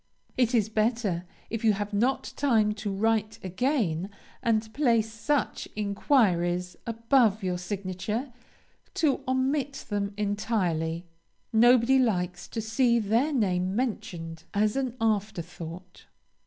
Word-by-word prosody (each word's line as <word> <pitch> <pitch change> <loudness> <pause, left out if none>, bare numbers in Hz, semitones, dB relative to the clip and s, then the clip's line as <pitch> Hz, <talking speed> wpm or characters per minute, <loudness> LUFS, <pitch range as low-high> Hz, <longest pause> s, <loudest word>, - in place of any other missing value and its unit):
It 250 -1 +2
is 220 -3 +3
better, 215 -5 0 0.3
if 225 0 -3
you 220 -2 +5
have 205 +1 -4
not 245 +6 0
time 220 -7 +2
to 210 -1 -4
write 215 +1 0
again 190 - 0 0.3
and 220 -2 0
place 230 -6 +2
such 255 +6 -1
inquiries 185 - +1
above 230 -2 +2
your 180 -1 -1
signature, 200 +6 -4 0.6
to 295 -4 +2
omit 265 +2 0
them 200 -1 -2
entirely. 185 -6 -1 0.5
Nobody 240 +3 +5
likes 180 -7 0
to 225 - -4
see 235 +2 +2
their 230 +7 +1
name 190 -7 0
mentioned 170 -9 -3
as 210 +1 +2
an 260 -2 -2
afterthought. 180 -5 -3
215 Hz, 115 wpm, -27 LUFS, 185-240 Hz, 0.6 s, you